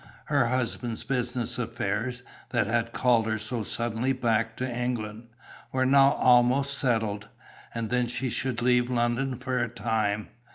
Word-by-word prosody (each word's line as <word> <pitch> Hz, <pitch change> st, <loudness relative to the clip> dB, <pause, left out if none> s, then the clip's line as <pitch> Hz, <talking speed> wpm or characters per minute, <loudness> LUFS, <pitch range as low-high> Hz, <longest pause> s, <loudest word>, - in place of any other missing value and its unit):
Her 140 Hz, -5 st, +2 dB
husband's 120 Hz, -2 st, -1 dB
business 125 Hz, -2 st, -1 dB
affairs, 115 Hz, +1 st, -2 dB, 0.3 s
that 120 Hz, -3 st, +1 dB
had 115 Hz, +2 st, 0 dB
called 120 Hz, -3 st, +2 dB
her 110 Hz, 0 st, 0 dB
so 115 Hz, +2 st, -4 dB
suddenly 120 Hz, +4 st, -1 dB
back 115 Hz, -3 st, 0 dB
to 130 Hz, -, -2 dB
England, 120 Hz, -2 st, -3 dB, 0.4 s
were 130 Hz, 0 st, +1 dB
now 135 Hz, +1 st, +6 dB
almost 125 Hz, +3 st, +4 dB
settled. 110 Hz, -5 st, 0 dB, 0.5 s
And 115 Hz, -1 st, -3 dB
then 125 Hz, -1 st, +1 dB
she 125 Hz, +1 st, -3 dB
should 125 Hz, -2 st, -1 dB
leave 125 Hz, 0 st, +3 dB
London 120 Hz, +2 st, 0 dB
for 130 Hz, +1 st, -2 dB
a 120 Hz, 0 st, 0 dB
time. 110 Hz, -2 st, -1 dB
120 Hz, 150 wpm, -27 LUFS, 115-125 Hz, 0.5 s, now